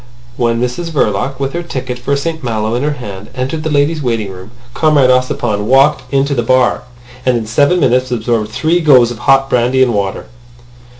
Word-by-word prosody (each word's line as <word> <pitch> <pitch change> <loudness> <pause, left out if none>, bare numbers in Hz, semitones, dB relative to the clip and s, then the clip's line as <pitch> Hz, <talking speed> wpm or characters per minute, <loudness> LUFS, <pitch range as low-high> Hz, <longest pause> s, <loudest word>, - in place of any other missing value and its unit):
When 120 -2 0
Mrs 125 +8 -3
Verloc, 135 -2 -1
with 135 0 -2
her 175 - -2
ticket 130 -7 -5
for 140 +3 -1
St 160 +2 -4
Malo 110 -2 -2
in 120 - -1
her 150 +1 0
hand, 105 -7 -9
entered 135 +4 -3
the 155 - -3
ladies' 150 +2 +1
waiting 115 -6 -2
room, 95 +2 -11 0.2
Comrade 135 0 +3
Ossipon 120 -5 0
walked 135 +4 +3
into 140 +1 +1
the 125 - 0
bar, 130 +1 +2 0.4
and 125 -2 +2
in 115 - -4
seven 145 +10 +2
minutes 130 -3 +1
absorbed 115 -2 -1
three 155 +10 0
goes 130 -7 +5
of 115 - -8
hot 135 +2 +3
brandy 125 +1 +2
and 120 -2 +1
water. 100 -2 -2
130 Hz, 190 wpm, -14 LUFS, 115-140 Hz, 0.4 s, goes